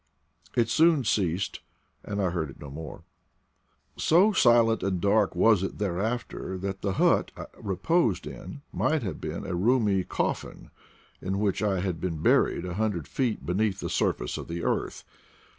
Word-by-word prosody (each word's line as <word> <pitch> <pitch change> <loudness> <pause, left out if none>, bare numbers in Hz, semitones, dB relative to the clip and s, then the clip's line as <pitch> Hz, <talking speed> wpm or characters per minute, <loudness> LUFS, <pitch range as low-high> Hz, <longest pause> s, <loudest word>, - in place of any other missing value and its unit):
It 115 -2 +3
soon 160 +1 +4
ceased, 95 -4 0 0.4
and 105 0 -4
I 95 -3 +1
heard 80 -4 -2
it - - -13
no 70 - -9
more. 80 +2 -8 0.9
So 185 +7 +4
silent 120 - +4
and 95 -2 -1
dark 100 +1 +2
was 105 +1 +4
it 95 - -4
thereafter 105 0 -3
that 95 +1 -4
theJiut 100 -2 +2
I - - -6 0.2
reposed 110 - +1
in 95 +11 -9
might 155 -4 +1
have 90 -7 -5
been 80 +4 -5
a 95 - -3
roomy 100 0 +2
cof - - -1
fin - - -12 0.5
in 95 +1 -2
which 100 -2 0
I 100 -4 +1
had 90 -4 -3
been 85 -4 -2
buried 85 - +3
a 90 - -4
hundred 100 -5 -1
feet 125 -5 -2
be 90 - -1
neath 105 0 0
the - - -4
surface - - -1
of - - -8
the 85 0 -4
earth. - - -2
100 Hz, 170 wpm, -27 LUFS, 90-115 Hz, 0.9 s, soon